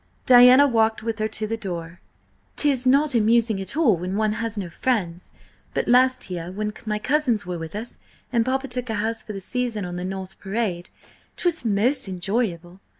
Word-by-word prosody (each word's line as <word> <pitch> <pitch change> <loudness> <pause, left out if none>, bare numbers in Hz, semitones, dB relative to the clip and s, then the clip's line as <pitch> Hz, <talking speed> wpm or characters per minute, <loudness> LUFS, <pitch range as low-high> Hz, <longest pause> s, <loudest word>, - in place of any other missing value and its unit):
Diana 250 +2 +8
walked 225 -4 +1
with 225 -1 -3
her 215 - 0
to 220 0 -4
the 225 +1 -2
door. 175 -5 -6 0.6
"'Tis 270 -4 +2
not 280 +2 +3
amusing 225 -2 +2
at 195 - -2
all 270 - +4
when 185 +3 -4
one 215 -1 +1
has 225 -1 -3
no 195 -3 -3
friends; 180 -2 -2 0.4
but - - -1
last 255 -3 +3
year, 175 -1 -5
when 210 +2 -3
my 210 0 0
cousins 255 -3 0
were 175 -1 -4
with 165 +3 -7
us 225 +3 -6 0.3
and 230 -1 +3
papa 265 +2 -1
took 250 -1 -4
a 220 - -1
house 220 +2 -2
for 215 - -8
the 195 - -5
season 235 -1 -2
on 175 0 -6
the 180 - -4
North 190 0 -6
Parade, 195 -4 -3 0.5
'twas 345 -5 0
most 225 +4 +1
enjoyable. 185 -2 -3
220 Hz, 190 wpm, -23 LUFS, 190-250 Hz, 0.6 s, Diana